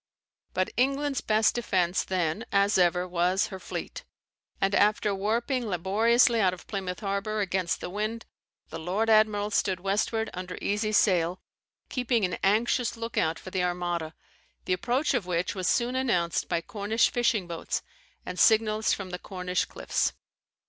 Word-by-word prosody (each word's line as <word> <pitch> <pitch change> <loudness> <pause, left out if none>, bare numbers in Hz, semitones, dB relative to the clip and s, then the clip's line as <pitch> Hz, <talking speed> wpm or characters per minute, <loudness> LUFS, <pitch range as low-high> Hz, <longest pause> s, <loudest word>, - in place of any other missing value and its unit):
] - - -50
But 185 0 0
England's 275 +2 +1
best 215 0 +3
defence 185 -6 0
then, 180 +2 -1
as 200 0 +3
ever, 180 0 +2
was 180 +3 +1
her 190 - -6
fleet; - - -6 0.6
and 195 0 +1
after 210 0 +3
warping 235 +5 -1
laboriously 225 +6 +3
out 185 -2 +2
of - - -16
Plymouth 190 -1 -4
harbour 200 +1 -2
against 190 -3 -1
the - - -4
wind, 215 +3 -3 0.4
the 160 - -6
lord 195 +7 0
admiral 215 -1 +3
stood 190 -3 +1
westward 210 +4 -1
under 180 0 -6
easy 210 +1 -1
sail, 180 -4 +2 0.5
keeping 245 -4 0
an 180 -2 -3
anxious 230 +4 +2
look 230 0 -5
out 160 -1 +1
for 185 - -10
the 185 - 0
Armada, 175 -2 -2 0.5
the - - +1
approach 250 +11 0
of 225 -8 -1
which 175 0 -1
was 185 -3 -3
soon 245 +1 +1
announced 180 -11 0
by 170 - 0
Cornish 210 +5 0
fishing 235 -5 +1
boats, 170 -1 -4 0.4
and 180 - -5
signals 220 -1 +4
from 190 -2 -5
the 180 - -5
Cornish 180 -1 -2
cliffs. - - -1
200 Hz, 160 wpm, -27 LUFS, 180-225 Hz, 0.6 s, signals